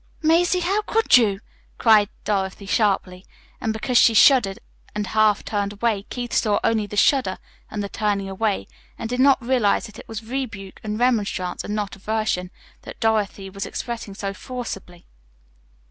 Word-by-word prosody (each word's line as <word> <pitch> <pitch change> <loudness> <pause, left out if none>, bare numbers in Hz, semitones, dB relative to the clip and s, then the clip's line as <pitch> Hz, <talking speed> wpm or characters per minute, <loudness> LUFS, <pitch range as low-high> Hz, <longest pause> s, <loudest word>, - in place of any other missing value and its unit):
"Mazie, 350 +3 +3
how 390 +5 +1
could 445 +1 +3
you!" 210 -5 +3 0.4
cried 215 -3 +5
Dorothy 195 -1 -2
sharply. 195 -3 0 0.4
And 220 - 0
because 235 +3 +2
she 225 - +5
shuddered 215 -5 +5 0.4
and 210 0 -1
half 215 0 +2
turned 205 -1 -2
away, 210 -1 -1
Keith 245 -1 -5
saw 210 -3 +2
only 220 -2 +1
the 210 - -7
shudder 250 -6 +3 0.3
and 210 -1 -4
the - - -3
turning 200 -1 -1
away, 195 +1 -1 0.3
and 230 - -4
did 250 +2 -3
not 270 0 +5
realize 240 -5 +2
that 215 +1 -11
it - - -12
was 225 0 -6
rebuke 220 -6 -5
and 210 0 -3
remonstrance, 210 -7 0
and 210 - -4
not 205 -2 -3
aversion, 205 -3 -2 0.3
that - - -11
Dorothy 210 -3 0
was 195 +2 -6
expressing 230 -5 -5
so 195 0 -4
forcibly. 200 -7 -7
215 Hz, 160 wpm, -22 LUFS, 200-240 Hz, 0.4 s, cried